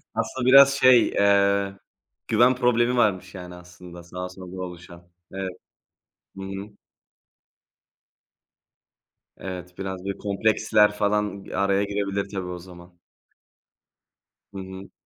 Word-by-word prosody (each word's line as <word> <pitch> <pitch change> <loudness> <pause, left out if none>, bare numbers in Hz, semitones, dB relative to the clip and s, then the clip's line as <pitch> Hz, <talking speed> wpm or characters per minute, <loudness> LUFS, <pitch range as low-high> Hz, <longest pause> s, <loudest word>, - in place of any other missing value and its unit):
Aslında 115 +3 -2
biraz 135 +1 +8
şey, 130 -3 +5
eee, 100 -1 +2 0.5
güven 120 +3 +4
problemi 125 0 +2
varmış 95 -4 0
yani 90 -1 -9
aslında 90 0 -13
daha 90 0 -5
sonra 95 0 -11 0.2
oluşan. 85 -1 -10 0.2
Evet. 95 -1 -4 0.9
Hı - - -7
hı. 95 +2 -8 2.6
Evet, 90 -1 -8
biraz 95 -1 -6
böyle 100 - -4
kompleksler 105 +1 +2
falan 105 -1 -1
araya 100 0 +1
girebilir 100 -1 -3
tabii 95 -3 -5
o 90 0 -6
zaman. 85 -1 -15 1.5
Hı - - -8
hı. 95 0 -9
100 Hz, 110 wpm, -24 LUFS, 90-105 Hz, 2.6 s, biraz